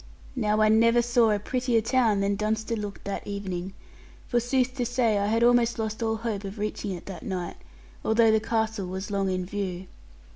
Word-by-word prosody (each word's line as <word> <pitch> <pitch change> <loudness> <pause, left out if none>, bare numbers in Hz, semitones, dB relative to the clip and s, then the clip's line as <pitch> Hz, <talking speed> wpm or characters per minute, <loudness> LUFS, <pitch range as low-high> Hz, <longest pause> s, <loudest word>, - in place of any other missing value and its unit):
Now 215 -3 +1
I 215 - +5
never 230 +2 +4
saw 240 -1 +3
a 210 - +2
prettier 245 +2 0
town 225 -3 +2
than 200 0 +1
Dunster 220 +2 -1
looked 205 -2 -6
that 200 - -5
evening; 190 -2 -4 0.5
for 240 - +2
sooth 255 +1 0
to 250 - 0
say, 235 -3 +1
I 200 - 0
had 225 +2 +2
almost 240 -1 +4
lost 220 0 -3
all 225 -1 +1
hope 220 -3 -3
of 195 +2 -7
reaching 210 -1 -3
it 175 - -8
that 185 -4 -7
night, 180 -2 -4 0.5
although 225 0 +4
the 220 - +4
castle 220 -2 -1
was 190 +3 -5
long 195 -1 0
in 185 -1 -1
view. 190 -2 -4
215 Hz, 195 wpm, -26 LUFS, 200-230 Hz, 0.5 s, I